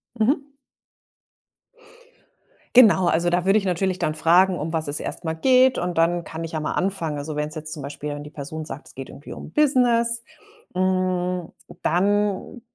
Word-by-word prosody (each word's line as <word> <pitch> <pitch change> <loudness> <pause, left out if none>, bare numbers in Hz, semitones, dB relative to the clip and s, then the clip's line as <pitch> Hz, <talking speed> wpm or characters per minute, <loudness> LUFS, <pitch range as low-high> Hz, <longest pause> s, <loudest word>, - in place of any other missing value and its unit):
Mhm. 275 +5 0 2.3
Genau, 210 -7 +7
also 170 +1 +2
da 175 0 +1
würde 195 +2 +4
ich 205 - -1
natürlich 185 0 0
dann 155 - -1
fragen, 175 +3 +3
um 155 +2 -3
was 160 -2 -1
es 145 +1 0
erst - - -5
mal 160 -1 -2
geht 255 +8 +4
und 175 -1 -3
dann 170 +1 +2
kann 160 0 -7
ich 165 - -6
ja 160 - -2
mal 155 - -2
anfangen. 175 -5 -1
Also, 145 +1 -5
wenn's 150 +1 -3
jetzt 155 0 -6
zum 155 - -7
Beispiel 145 +1 -6
wenn 145 0 -6
die 150 - -10
Person 150 +2 -7
sagt, 145 -2 -9
es - - -16
geht 135 0 -8
irgendwie 145 - -10
um - - -9
Business, 240 -5 +3 0.5
hm, 185 -1 0 0.3
dann 205 +5 0
175 Hz, 180 wpm, -23 LUFS, 155-200 Hz, 2.3 s, Genau